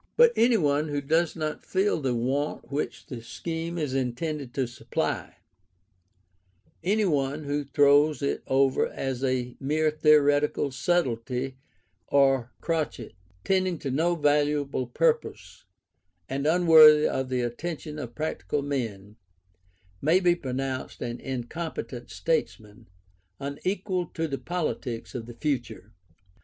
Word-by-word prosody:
But 480 0 +7
any 235 0 +4
one 150 -2 +1
who 145 -1 -1
does 160 +4 +1
not 155 -2 -4
feel 190 -3 0
the 130 -3 0
want 135 +5 -2
which 145 +2 -3
the 125 -4 -7
scheme 165 +8 -5
is 150 -5 -2
intended 135 +2 -2
to 135 - +1
supply; 120 - -3 1.5
any 210 +4 +2
one 145 -3 0
who 145 0 -2
throws 145 +2 +4
it 140 - -1
over 135 0 +3
as 135 -1 -4
a 125 -2 -1
mere 155 +3 +1
theoretical 150 -2 +3
subtlety 130 -4 -1 0.5
or 135 -3 +3
crotchet, 165 -3 -2 0.3
tending 185 -2 +1
to 140 -3 -4
no 165 +6 +1
valuable 145 -3 +1
purpose, 155 +5 -1 0.6
and 140 +2 -2
unworthy 155 -3 +7
of 130 -1 -2
the 130 -1 0
attention 150 +5 -4
of 120 -5 -7
practical 150 -2 -2
men, 110 -7 -4 0.8
may 165 +6 +4
be 180 -2 +4
pronounced 135 -4 -4
an 120 0 -4
incompetent 130 -1 -5
statesman, 105 - -3 0.5
unequal 180 +5 -2
to 165 0 -1
the 140 -2 -4
politics 145 -9 -3
of 120 -2 -6
the 120 - -10
future. 120 -7 -3
145 Hz, 125 wpm, -27 LUFS, 130-160 Hz, 1.5 s, But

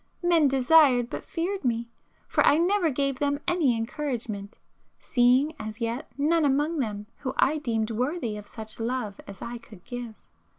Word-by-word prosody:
Men 335 -4 +4
desired, 265 -2 +4
but - - -5
feared 370 +2 -3
me; 235 -2 0 0.4
for - - +2
I 290 - +5
never 355 +1 +2
gave 275 -1 -1
them 285 0 0
any 300 -10 +2
encouragement, 225 -5 -4 0.4
seeing 255 +5 +3
as 215 +1 -6
yet 235 +4 -3
none 315 +3 +2
among 295 +3 +1
them 210 -5 -3
whom 260 -3 -4
I 305 +3 +3
deemed 225 -5 -1
worthy 245 0 -2
of 210 -1 -9
such 220 -1 -9
love 230 -3 -3
as 200 -1 -9
I 240 0 -5
could 210 -5 -15
give. 245 -3 -6
255 Hz, 165 wpm, -27 LUFS, 225-300 Hz, 0.4 s, I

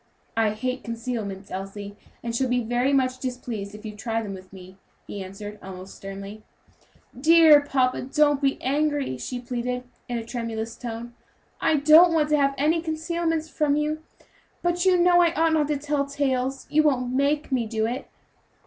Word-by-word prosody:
"I 225 -1 +3
hate 255 +4 -3
concealments, 225 -4 -5
Elsie, 200 +2 -6 0.3
and 230 -1 -3
shall 260 +1 +1
be 245 -1 +1
very 245 +4 +1
much 255 -2 +1
displeased 240 -6 -5
if 210 +1 -12
you 210 -1 -6
try 225 +1 -2
them 200 -2 -5
with 185 -1 -11
me," 185 0 -13 0.3
he 200 - -6
answered, 205 +2 -8
almost 190 0 -9
sternly. 195 +2 -8 0.7
"Dear 310 +2 +7
papa, 260 -3 +1
don't 295 -1 +3
be 275 -1 +1
angry," 285 - 0
she 245 - -4
pleaded, 250 0 -3 0.3
in 240 - -1
a 230 - -5
tremulous 230 -1 -4
tone; 235 0 -6 0.5
"I 320 - +2
don't 310 +4 +7
want 305 -2 +2
to 300 - +4
have 275 -1 +2
any 315 +4 +2
concealments 325 0 -2
from 300 -2 +1
you, 305 +1 -1 0.6
but 350 +1 +1
you 370 -1 +5
know 350 0 +5
I 340 -1 +3
ought 325 0 +3
not 305 -2 +2
to 295 -1 0
tell 285 0 -1
tales. 270 -2 -1
You 310 - +5
won't 255 -5 +1
make 285 +3 +1
me 245 -4 +1
do 220 0 -1
it?" 245 +4 -3
255 Hz, 175 wpm, -25 LUFS, 225-300 Hz, 0.7 s, Dear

